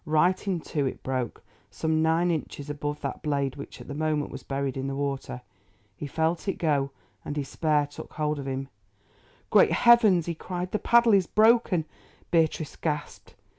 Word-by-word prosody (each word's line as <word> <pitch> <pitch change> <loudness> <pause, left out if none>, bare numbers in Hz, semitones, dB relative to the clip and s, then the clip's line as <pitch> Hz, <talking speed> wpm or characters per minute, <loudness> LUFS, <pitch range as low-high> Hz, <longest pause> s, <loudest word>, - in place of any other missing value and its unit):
Right 175 +5 +2
in 180 -4 0
two 145 -3 -1
it - - -6
broke, 130 -3 -3 0.3
some 160 +10 0
nine 165 +2 +2
inches 145 -2 -4
above 145 0 -4
that - - -4
blade 140 -3 -1
which 140 - -9
at - - -11
the 145 - -5
moment 155 0 -1
was - - -7
buried 135 -1 -3
in 135 0 -3
the 135 - -3
water. 135 -3 -3 0.5
He 145 - -6
felt 160 +5 -1
it 195 - 0
go, 145 -4 +1 0.3
and 145 - -5
despair 150 +1 0
took 145 - -11
hold 150 -1 -1
of 135 - -6
him. 135 0 -3 0.8
"Great - - +6
heavens!" 225 -8 +5
he 170 - -2
cried, 180 +2 -5
"the 215 - 0
paddle 235 -1 +5
is 190 -4 +4
broken." 215 -7 +4 0.5
Beatrice 160 -2 +1
gasped. 150 -2 -4
155 Hz, 175 wpm, -27 LUFS, 140-175 Hz, 0.8 s, Great